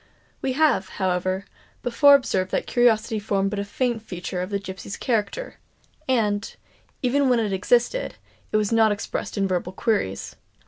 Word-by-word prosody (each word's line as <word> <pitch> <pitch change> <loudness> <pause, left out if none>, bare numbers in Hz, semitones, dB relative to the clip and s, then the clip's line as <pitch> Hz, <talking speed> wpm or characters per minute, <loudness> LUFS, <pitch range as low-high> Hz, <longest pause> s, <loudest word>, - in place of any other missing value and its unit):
We 260 - -1
have, 270 -10 +2
however, 185 0 0 0.4
before 280 +4 +6
observed 190 -9 0
that - - -1
curiosity 225 -2 +2
formed 195 -2 0
but 210 - -2
a - - -1
faint 235 +3 -1
feature 180 -3 -5
of 185 - -4
the 200 - 0
gipsy 190 -3 -8
character; 240 - -2 0.5
and, 220 -3 0 0.5
even 265 +2 +2
when 245 -2 +4
it 210 -3 -1
existed, 240 - +1 0.4
it - - +3
was 210 0 0
not 225 -1 +4
expressed 205 +1 -4
in 195 -1 +2
verbal 180 0 -2
queries. 185 - -1
210 Hz, 155 wpm, -24 LUFS, 190-245 Hz, 0.5 s, before